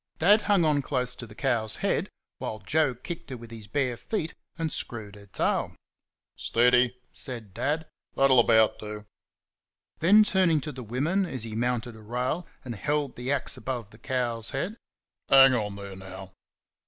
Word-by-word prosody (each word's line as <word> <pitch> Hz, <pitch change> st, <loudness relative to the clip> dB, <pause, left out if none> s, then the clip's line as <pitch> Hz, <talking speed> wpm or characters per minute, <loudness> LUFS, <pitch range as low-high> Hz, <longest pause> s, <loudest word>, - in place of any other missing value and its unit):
Dad 205 Hz, +6 st, +5 dB
hung 195 Hz, -5 st, +5 dB
on 150 Hz, -2 st, +3 dB
close 125 Hz, -2 st, -1 dB
to 120 Hz, -, -7 dB
the 105 Hz, -, -13 dB
cow's 115 Hz, -6 st, 0 dB
head, -, -, 0 dB, 0.3 s
while 110 Hz, -, -4 dB
Joe 130 Hz, +6 st, +1 dB
kicked 165 Hz, +7 st, -7 dB
her 130 Hz, -, -5 dB
with 115 Hz, 0 st, -12 dB
his 110 Hz, -3 st, -9 dB
bare 125 Hz, +2 st, 0 dB
foot 165 Hz, -, -3 dB, 0.2 s
and 165 Hz, -2 st, -2 dB
screwed 110 Hz, -3 st, -5 dB
her 100 Hz, -1 st, -14 dB
tail. 95 Hz, -, 0 dB, 0.6 s
"Steady!" 125 Hz, +1 st, +3 dB
said 115 Hz, -7 st, -1 dB
Dad, 155 Hz, +8 st, -1 dB, 0.3 s
"that'll 135 Hz, -2 st, +5 dB
about 110 Hz, -2 st, +4 dB
do." 105 Hz, 0 st, -7 dB, 0.9 s
Then, 205 Hz, +6 st, +7 dB
turning 185 Hz, -6 st, +3 dB
to 150 Hz, -, -5 dB
the 130 Hz, -2 st, -8 dB
women 150 Hz, -, 0 dB
as 130 Hz, -8 st, -3 dB
he 110 Hz, -2 st, -6 dB
mounted 120 Hz, 0 st, -1 dB
a 110 Hz, -, -13 dB
rail 125 Hz, +10 st, -2 dB, 0.2 s
and 120 Hz, -, -4 dB
held 145 Hz, +4 st, -1 dB
the 125 Hz, +3 st, -3 dB
axe 140 Hz, -2 st, -1 dB
above 120 Hz, -5 st, -4 dB
the 110 Hz, -, -16 dB
cow's 120 Hz, -3 st, -2 dB
head: 175 Hz, +11 st, -3 dB, 0.5 s
"Hang 135 Hz, -1 st, +8 dB
on 105 Hz, -4 st, -1 dB
there 100 Hz, -1 st, -8 dB
now!" 95 Hz, 0 st, -10 dB
125 Hz, 170 wpm, -27 LUFS, 110-145 Hz, 0.9 s, Hang